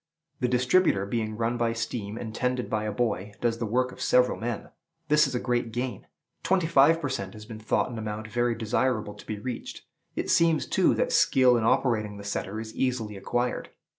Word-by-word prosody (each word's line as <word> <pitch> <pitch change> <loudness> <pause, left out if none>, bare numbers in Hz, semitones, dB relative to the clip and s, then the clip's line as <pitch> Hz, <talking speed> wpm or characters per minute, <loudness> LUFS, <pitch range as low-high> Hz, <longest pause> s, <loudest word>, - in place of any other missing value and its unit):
The 125 - +1
distributer, 125 - +3
being 110 0 -2
run 115 +1 0
by 115 -1 +1
steam 115 -2 -4
and 110 -2 -6
tended 125 +1 -1
by 110 -1 0
a 105 - -1
boy, 105 -3 -1
does 115 -1 0
the 115 - -2
work 125 +3 +1
of - - -11
several 125 0 +3
men. 115 -1 -4 0.4
This 150 0 +5
is 135 - -4
a - - +1
great 120 -2 -1
gain; 125 +2 -4 0.3
twenty 185 -2 +2
five 160 +1 +5
per 145 - -2
cent. 100 -8 -4
has 105 0 -10
been 110 0 -9
thought 110 +3 0
an 115 - -5
amount 110 0 -5
very 120 +2 0
desirable 110 -1 0
to 105 - -14
be 110 - -3
reached. 120 +3 -6 0.3
It - - -1
seems, 165 -2 +3
too, - - +3
that - - 0
skill 130 -2 +5
in 115 -2 +1
operating 110 -4 +1
the 100 - -9
setter 100 +1 -3
is 110 0 -7
easily 120 -5 -1
acquired. 120 +5 -2
115 Hz, 205 wpm, -27 LUFS, 110-125 Hz, 0.4 s, This